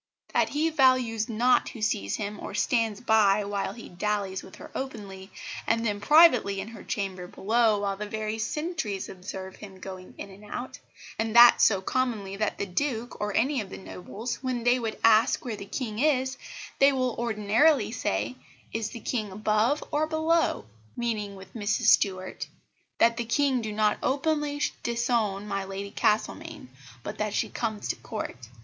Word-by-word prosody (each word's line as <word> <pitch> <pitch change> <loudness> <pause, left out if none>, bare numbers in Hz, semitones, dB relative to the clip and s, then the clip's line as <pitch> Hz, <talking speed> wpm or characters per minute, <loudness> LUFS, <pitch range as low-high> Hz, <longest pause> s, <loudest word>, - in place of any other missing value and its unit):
That - - +3
he 315 +3 0
values 255 -6 +3
not 240 +3 +3
who 230 - -10
sees 100 - 0
him, 205 0 -4
or - - -6
stands 220 +1 +1
by 210 -3 +4
while 200 -1 -2
he 230 - -10
dallies 195 0 -2
with 190 - -13
her - - -11
openly; 205 -7 -6 0.4
and 230 0 +1
then 205 -2 -1
privately 255 -10 +6
in 200 +3 -5
her 230 - -11
chamber 190 -3 -3
below, 220 +2 +2
while 200 -1 -1
the 210 +2 -5
very 215 0 -3
sentrys 300 - -3
observe 190 0 -8
him 195 -3 -11
going 185 -1 -9
in 200 - -8
and 195 +2 -14
out; 245 +5 -6 0.4
and 225 0 -1
that 240 0 +9
so 195 -3 +4
commonly 215 -4 -1
that 210 +1 -1
the - - -2
Duke, 235 +4 -3
or 210 -1 -2
any 265 +2 +2
of 195 - -8
the - - -8
Nobles, 200 +6 -6
when 255 -3 -2
they 245 +1 +4
would 225 -2 -3
ask 225 +3 +4
where 235 -3 -3
the 200 -1 -8
King 220 -1 -4
is, 265 -2 +2 0.4
they 275 +1 +7
will 255 -3 0
ordinarily 230 +4 +3
say, 115 - -2 0.4
'Is 220 -1 -2
the 235 - -9
King 215 -4 -2
above 215 +7 +1
or 305 +1 +1
below?' 320 - +1 0.3
meaning 215 -4 -2
with 190 0 -13
Mrs 220 +2 -1
Stuart; 190 -3 +2 0.5
that 230 0 +4
the 240 - -2
King 260 +2 +2
do 220 -1 -4
not 210 0 +1
openly 290 +1 0 0.2
disown 235 -4 0
my 195 -1 -2
Lady 195 +1 -6
Castlemaine, 210 - -1 0.3
but 210 - -6
that 210 -1 -1
she - - 0
comes 220 -3 -3
to - - 0
Court." 115 +1 -7
215 Hz, 175 wpm, -27 LUFS, 200-245 Hz, 0.5 s, that